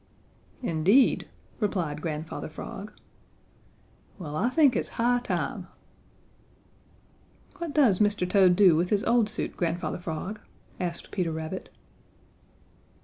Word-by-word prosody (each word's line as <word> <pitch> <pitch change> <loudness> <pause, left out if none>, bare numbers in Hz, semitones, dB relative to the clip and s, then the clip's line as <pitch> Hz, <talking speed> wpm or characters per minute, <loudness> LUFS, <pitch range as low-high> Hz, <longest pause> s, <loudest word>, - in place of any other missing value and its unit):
"Indeed!" 195 - +3 0.3
replied 175 -9 -1
Grandfather 155 0 -4
Frog. 195 +6 -8 1.3
"Well, 150 -5 -6
I 235 +10 +1
think 280 -2 +4
it's - - -1
high 245 +1 +3
time." 245 - -3 1.9
"What 335 -4 -5
does 245 -11 +4
Mr. 205 -3 +2
Toad 185 -2 +5
do 185 -4 +6
with 175 +3 +1
his 205 -1 +1
old 235 -3 +3
suit, 215 - -3
Grandfather 170 -1 -2
Frog?" 175 +5 -5 0.4
asked 175 -2 -4
Peter 180 -4 -1
Rabbit. 160 +3 -5
185 Hz, 110 wpm, -27 LUFS, 165-215 Hz, 1.9 s, do